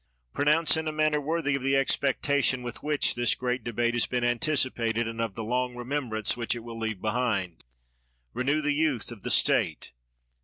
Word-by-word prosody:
Pronounce 150 Hz, +3 st, +3 dB
in 160 Hz, 0 st, -2 dB
a -, -, 0 dB
manner 155 Hz, -1 st, +1 dB
worthy 155 Hz, -1 st, -1 dB
of 135 Hz, -, -1 dB
the 135 Hz, +1 st, +1 dB
expec 135 Hz, 0 st, +1 dB
tation 140 Hz, -3 st, +2 dB
with 120 Hz, -1 st, -6 dB
which 150 Hz, -1 st, +1 dB
this 120 Hz, -2 st, +2 dB
great 125 Hz, -1 st, -2 dB
debate 120 Hz, +1 st, 0 dB
has 120 Hz, -, +2 dB
been 125 Hz, -1 st, -1 dB
anticipated, 120 Hz, -3 st, +1 dB
and 115 Hz, 0 st, -4 dB
of 115 Hz, -4 st, -3 dB
the 115 Hz, -, -4 dB
long 125 Hz, +2 st, -1 dB
remembrance 120 Hz, -4 st, -2 dB
which 120 Hz, 0 st, -2 dB
it 120 Hz, -, -7 dB
will 115 Hz, -1 st, -8 dB
leave 110 Hz, -3 st, -3 dB
behind. 110 Hz, -6 st, -1 dB, 0.7 s
Renew 140 Hz, +5 st, 0 dB
the 145 Hz, 0 st, +1 dB
youth 145 Hz, -6 st, 0 dB
of 115 Hz, -4 st, -10 dB
the -, -, -4 dB
State. -, -, +2 dB
125 Hz, 190 wpm, -27 LUFS, 115-145 Hz, 0.7 s, Pronounce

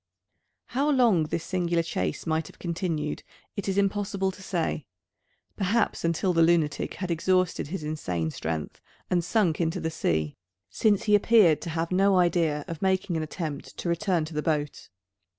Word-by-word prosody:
How 275 Hz, +4 st, +1 dB
long 235 Hz, -, +4 dB
this 160 Hz, +2 st, -3 dB
singular 175 Hz, -2 st, 0 dB
chase 165 Hz, -, -3 dB
might 160 Hz, -1 st, 0 dB
have -, -, -15 dB
continued, 165 Hz, -3 st, -2 dB, 0.3 s
it 200 Hz, 0 st, -3 dB
is 195 Hz, -, -1 dB
impossible 200 Hz, -1 st, 0 dB
to 185 Hz, -, -14 dB
say. 170 Hz, -6 st, -2 dB, 0.7 s
Perhaps 210 Hz, +4 st, 0 dB
until 170 Hz, +2 st, +1 dB
the 165 Hz, -, +3 dB
lunatic 165 Hz, -3 st, +2 dB
had 185 Hz, -2 st, -4 dB
exhausted 185 Hz, 0 st, +1 dB
his 165 Hz, 0 st, -5 dB
insane 90 Hz, -, -2 dB
strength, 80 Hz, -1 st, -4 dB, 0.3 s
and 175 Hz, -1 st, +2 dB
sunk 180 Hz, -4 st, +1 dB
into 165 Hz, +2 st, 0 dB
the 160 Hz, -, -2 dB
sea: 80 Hz, -, -1 dB, 0.3 s
since 210 Hz, -, +2 dB
he 210 Hz, -, +2 dB
appeared 205 Hz, -6 st, +5 dB
to 170 Hz, -, -5 dB
have 165 Hz, +1 st, -2 dB
no 195 Hz, +1 st, +4 dB
idea 165 Hz, -4 st, +2 dB
of 165 Hz, -2 st, -6 dB
making 190 Hz, -1 st, +1 dB
an 160 Hz, -, 0 dB
attempt 155 Hz, -2 st, -5 dB
to 175 Hz, -, -3 dB
return 170 Hz, -1 st, +1 dB
to 160 Hz, -, -9 dB
the 150 Hz, -, -1 dB
boat. 150 Hz, -2 st, -2 dB
170 Hz, 170 wpm, -27 LUFS, 155-190 Hz, 0.7 s, appeared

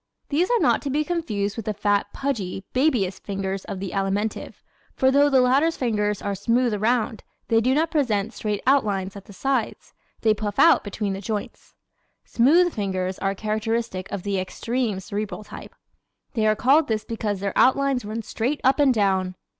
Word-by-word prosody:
These 325 Hz, +5 st, +1 dB
are 485 Hz, -1 st, +3 dB
not -, -, +3 dB
to 285 Hz, -, -4 dB
be 295 Hz, +3 st, +1 dB
confused 215 Hz, -, -2 dB
with 225 Hz, -, -5 dB
the 215 Hz, -, -1 dB
fat, 205 Hz, 0 st, +1 dB
pudgy 205 Hz, -9 st, -3 dB
babyish 250 Hz, -9 st, +1 dB
fingers 195 Hz, -1 st, -4 dB
of 190 Hz, -, -6 dB
the 195 Hz, -1 st, -5 dB
Alimentive, 200 Hz, +2 st, -2 dB, 0.3 s
for 265 Hz, 0 st, +3 dB
though 285 Hz, +1 st, +4 dB
the 265 Hz, -2 st, +4 dB
latter's 275 Hz, +6 st, +3 dB
fingers 210 Hz, -4 st, -1 dB
are 200 Hz, -, -1 dB
smooth 230 Hz, +4 st, +1 dB
around, 220 Hz, +1 st, 0 dB, 0.3 s
they 225 Hz, 0 st, +4 dB
do 255 Hz, +3 st, +2 dB
not 320 Hz, +2 st, +1 dB
present 225 Hz, -7 st, 0 dB
straight 210 Hz, -2 st, -3 dB
outlines 205 Hz, -8 st, +1 dB
at 200 Hz, -, -10 dB
the -, -, -13 dB
sides. 260 Hz, +2 st, -2 dB, 0.3 s
They 220 Hz, -1 st, +4 dB
puff 205 Hz, -1 st, -4 dB
out 335 Hz, -, +6 dB
between 205 Hz, -1 st, -3 dB
the 195 Hz, -, -5 dB
joints. 210 Hz, +1 st, -6 dB, 0.5 s
Smooth 330 Hz, +9 st, +4 dB
fingers 190 Hz, -2 st, -2 dB
are 195 Hz, 0 st, -1 dB
characteristic 215 Hz, -2 st, -2 dB
of 195 Hz, -, -4 dB
the 200 Hz, -2 st, -1 dB
extreme 225 Hz, +2 st, -2 dB
Cerebral 200 Hz, +1 st, -5 dB
type. 210 Hz, -, -11 dB, 0.6 s
They 220 Hz, -2 st, +1 dB
are 215 Hz, -, +3 dB
called 280 Hz, +8 st, +3 dB
this 220 Hz, -2 st, -1 dB
because 215 Hz, -3 st, -3 dB
their 200 Hz, 0 st, -2 dB
outlines 270 Hz, 0 st, +3 dB
run 220 Hz, +2 st, -5 dB
straight 250 Hz, +8 st, -2 dB
up 265 Hz, +3 st, +3 dB
and 285 Hz, -2 st, +5 dB
down. 190 Hz, -5 st, +1 dB
215 Hz, 180 wpm, -24 LUFS, 200-260 Hz, 0.6 s, out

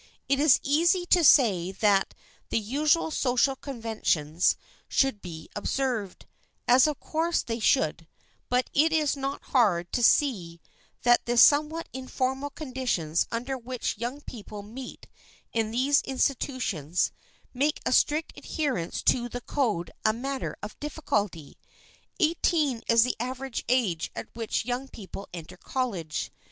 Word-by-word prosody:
It 275 Hz, 0 st, +2 dB
is 290 Hz, -2 st, +5 dB
easy 340 Hz, +5 st, +3 dB
to 350 Hz, -, +6 dB
say 200 Hz, -, +5 dB
that 195 Hz, -1 st, +2 dB, 0.3 s
the -, -, 0 dB
usual 290 Hz, +9 st, +1 dB
social 265 Hz, -1 st, +2 dB
conventions 220 Hz, -, 0 dB, 0.3 s
should 270 Hz, -7 st, +1 dB
be 160 Hz, -3 st, -8 dB
observed, 225 Hz, -3 st, -2 dB, 0.4 s
as 250 Hz, +4 st, +6 dB
of 300 Hz, -, -2 dB
course 330 Hz, +2 st, -1 dB
they 230 Hz, 0 st, -4 dB
should; 165 Hz, -5 st, +1 dB, 0.4 s
but 250 Hz, +1 st, +1 dB
it 315 Hz, +3 st, +4 dB
is 305 Hz, -3 st, +2 dB
not 275 Hz, 0 st, -4 dB
hard 185 Hz, -9 st, +3 dB
to 245 Hz, -, 0 dB
see 200 Hz, -, +2 dB, 0.4 s
that 240 Hz, 0 st, +4 dB
the 240 Hz, 0 st, 0 dB
somewhat 300 Hz, +6 st, +5 dB
informal 260 Hz, +1 st, -2 dB
conditions 250 Hz, -, -1 dB
under 245 Hz, +4 st, -2 dB
which 245 Hz, -3 st, -4 dB
young 245 Hz, +5 st, -4 dB
people 210 Hz, -5 st, -9 dB
meet 245 Hz, +5 st, -9 dB, 0.5 s
in 225 Hz, -2 st, 0 dB
these 265 Hz, +5 st, +3 dB
institutions, 255 Hz, -, -1 dB, 0.4 s
make 285 Hz, +4 st, 0 dB
a -, -, +1 dB
strict 300 Hz, +5 st, +2 dB
adherence 260 Hz, -, -3 dB
to 240 Hz, -1 st, +2 dB
the 245 Hz, +1 st, -6 dB
code 215 Hz, -, -1 dB
a 215 Hz, -, +3 dB
matter 270 Hz, +3 st, -4 dB
of 210 Hz, -, -8 dB
difficulty. 210 Hz, -, -3 dB, 0.6 s
Eighteen 310 Hz, -6 st, +1 dB
is 230 Hz, -1 st, +6 dB
the 250 Hz, -, -1 dB
average 255 Hz, +1 st, -4 dB
age 215 Hz, -11 st, +1 dB
at -, -, -6 dB
which 225 Hz, -1 st, -2 dB
young 250 Hz, +2 st, -3 dB
people 200 Hz, -4 st, -9 dB
enter 170 Hz, -2 st, -9 dB
college. 195 Hz, -13 st, -3 dB
250 Hz, 135 wpm, -27 LUFS, 210-275 Hz, 0.6 s, to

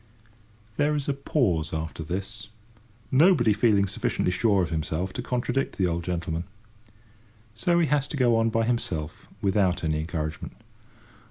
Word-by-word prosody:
There 150 Hz, +1 st, +2 dB
is 145 Hz, -2 st, -2 dB
a 140 Hz, -, +1 dB
pause 115 Hz, -, 0 dB
after 80 Hz, 0 st, -4 dB
this, 100 Hz, +6 st, -5 dB, 0.6 s
nobody 135 Hz, -, +5 dB
feeling 105 Hz, -3 st, +3 dB
sufficiently 95 Hz, -1 st, -1 dB
sure 100 Hz, 0 st, +2 dB
of 85 Hz, -, -4 dB
himself 80 Hz, +3 st, -2 dB
to -, -, -3 dB
contradict 125 Hz, +2 st, -2 dB
the 95 Hz, -, +2 dB
old 85 Hz, -1 st, -1 dB
gentleman. 85 Hz, -1 st, -3 dB, 1.1 s
So 170 Hz, +11 st, +1 dB
he 170 Hz, -, +4 dB
has 145 Hz, -2 st, +1 dB
to 150 Hz, -, -4 dB
go 120 Hz, -3 st, +4 dB
on 115 Hz, 0 st, +2 dB
by 115 Hz, 0 st, +1 dB
himself 85 Hz, -10 st, -3 dB, 0.2 s
without 95 Hz, -3 st, +2 dB
any 80 Hz, -1 st, 0 dB
encouragement. 80 Hz, -1 st, -4 dB
100 Hz, 150 wpm, -26 LUFS, 85-125 Hz, 1.1 s, nobody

